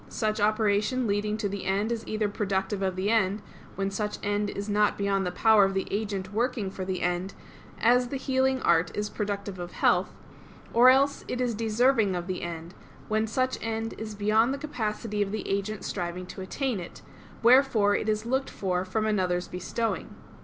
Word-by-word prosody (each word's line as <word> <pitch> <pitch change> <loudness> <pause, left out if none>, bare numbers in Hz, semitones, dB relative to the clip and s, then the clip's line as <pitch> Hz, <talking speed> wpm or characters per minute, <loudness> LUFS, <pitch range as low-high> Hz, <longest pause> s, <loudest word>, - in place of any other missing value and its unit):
Such 215 -1 -1
operation 215 +3 +2
leading 210 0 0
to 215 -2 -1
the 200 0 -5
end 200 +4 0
is 230 -1 -3
either 215 -1 0
productive 195 -1 -2
of 190 -1 0
the 190 +3 0
end, 205 -2 +1 0.3
when 195 0 -1
such 210 +1 -3
end 205 0 0
is 200 +1 -5
not 210 0 +2
beyond 195 -2 0
the - - -2
power 220 +2 +5
of 195 0 +1
the 190 - -1
agent 200 -2 -3
working 220 -3 -1
for 190 - -5
the 185 0 -3
end, 180 +2 -1 0.4
as 245 +2 +4
the 275 - -3
healing 265 0 +1
art 170 0 +3
is 210 0 -2
productive 200 -2 -4
of 175 0 -6
health; - - +2 0.6
or 240 +2 +7
else 275 +2 +3
it 250 - -3
is 245 -2 0
deserving 225 -1 +2
of 175 -1 -3
the 185 -1 -4
end, 170 0 -6 0.4
when 215 +1 +1
such 255 +4 0
end 225 0 -3
is 215 -1 -6
beyond 215 +4 +3
the 280 - -10
capacity 215 -5 -3
of 200 -1 0
the 215 - -4
agent 200 +1 -2
striving 180 -1 -4
to 190 - -9
attain 240 +3 -2
it; 175 - -9 0.4
wherefore 235 -5 +5
it 220 - -1
is 215 +1 0
looked 265 +3 0
for 180 -2 -1
from 215 +4 -1
another's 185 -4 0
bestowing. 225 +6 -3
210 Hz, 190 wpm, -27 LUFS, 195-225 Hz, 0.6 s, or